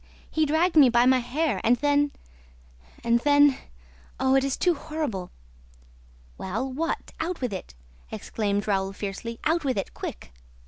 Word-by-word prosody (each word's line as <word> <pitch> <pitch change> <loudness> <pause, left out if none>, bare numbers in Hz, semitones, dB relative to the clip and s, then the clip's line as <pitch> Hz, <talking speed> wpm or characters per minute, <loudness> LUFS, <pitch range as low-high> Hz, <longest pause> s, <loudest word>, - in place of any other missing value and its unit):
He 315 -1 +1
dragged 325 +4 +2
me 285 -5 +8
by 240 +1 +4
my 260 0 +5
hair 250 - -1
and 240 - +4
then... 290 +2 +2 0.9
and 235 0 +3
then... 290 +1 +5 0.6
Oh, 265 0 +2
it 270 0 +4
is 275 -1 -1
too 360 - +3
horrible!" 295 - -4 1.1
"Well, 205 +8 -3
what? 330 +5 -3
Out 335 +2 -2
with 250 -5 -2
it!" 125 - -7 0.4
exclaimed 205 -2 -2
Raoul 195 -1 0
fiercely. 205 +4 -5
"Out 330 +1 +1
with 260 -5 0
it, 195 - -3
quick!" - - -7
260 Hz, 150 wpm, -26 LUFS, 215-300 Hz, 1.1 s, me